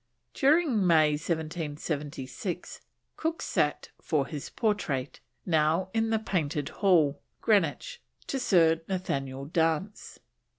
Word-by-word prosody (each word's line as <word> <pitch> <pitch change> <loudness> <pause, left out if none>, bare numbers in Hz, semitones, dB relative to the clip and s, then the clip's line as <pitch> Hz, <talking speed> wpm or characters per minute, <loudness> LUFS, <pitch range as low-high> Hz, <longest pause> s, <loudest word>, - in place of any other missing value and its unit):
During 275 - +3
May 155 -3 +5
1776 155 +1 -4 0.4
Cook 320 +1 -2
sat - - 0
for 150 -4 0
his 150 -2 -6
portrait, 155 - -1 0.3
now 165 +3 +2
in 225 0 +1
the 225 - +2
Painted 155 -9 -2
Hall, 160 -8 +2 0.2
Greenwich, 215 - +1 0.2
to 270 - -2
Sir 165 -8 +4
Nathaniel 140 -8 -3
Dance. 165 +6 -1
165 Hz, 100 wpm, -28 LUFS, 150-205 Hz, 0.4 s, May